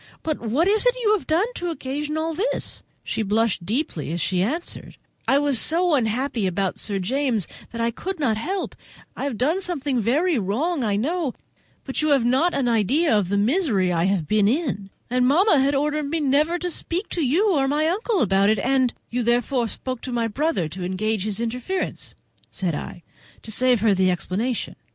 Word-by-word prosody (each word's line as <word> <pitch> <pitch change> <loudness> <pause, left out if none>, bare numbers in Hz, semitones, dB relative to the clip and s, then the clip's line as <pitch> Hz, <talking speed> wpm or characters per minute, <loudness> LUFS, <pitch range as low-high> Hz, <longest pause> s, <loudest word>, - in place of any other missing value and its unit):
But 310 -2 -2
what 250 - +1
is 425 +2 +3
it - - +4
you 430 -3 +3
have 405 - -6
done 330 +6 +3
to 350 -6 -3
occasion 300 0 -3
all 320 +1 -1
this?" 415 +10 -2 0.2
She - - -2
blushed 215 -2 +1
deeply 215 - -2
as 170 - -2
she 180 +1 0
answered: 310 - -3 0.3
"I 270 - +4
was 285 -4 +2
so 345 +1 +2
unhappy 240 -3 0
about 190 +1 -1
Sir 200 -2 -1
James 235 - 0 0.2
that 230 - -6
I 230 0 +1
could 370 - -5
not 245 -7 +2
help—I 360 - -6
have 270 -6 -3
done 310 - +1
something 285 -9 -1
very 290 - +2
wrong, 260 - -1
I 210 -3 +1
know; 295 - -1 0.5
but 265 - -2
you 305 - +1
have 275 -5 +3
not 265 +9 +2
an 265 -3 +1
idea 240 - +2
of 200 -4 +1
the 200 - +1
misery 210 - +2
I 170 0 +1
have 190 -5 0
been 210 +1 +3
in: 235 - -1 0.2
and 250 0 +2
mamma 320 +3 +4
had 275 +2 +2
ordered 295 +1 0
me 325 +2 -1
never 300 +4 +2
to 355 0 -3
speak 350 +5 -3
to 345 - -2
you 365 - +3
or 270 -2 +2
my 300 +3 +1
uncle 405 +3 0
about 195 0 +3
it, 215 - +3
and—" 260 -1 +1 0.2
"You 245 +1 0
therefore 240 +1 +1
spoke 255 +2 -4
to 255 - -5
my 235 -1 0
brother 245 - 0
to 180 +4 -7
engage 200 +3 -1
his 215 0 -2
interference," 250 +11 -3 0.3
said 180 -4 -2
I, 165 +3 -6 0.4
to 220 - -6
save 250 0 +3
her 215 -2 +4
the 190 -1 +3
explanation. 205 +7 -2
255 Hz, 195 wpm, -23 LUFS, 215-315 Hz, 0.5 s, it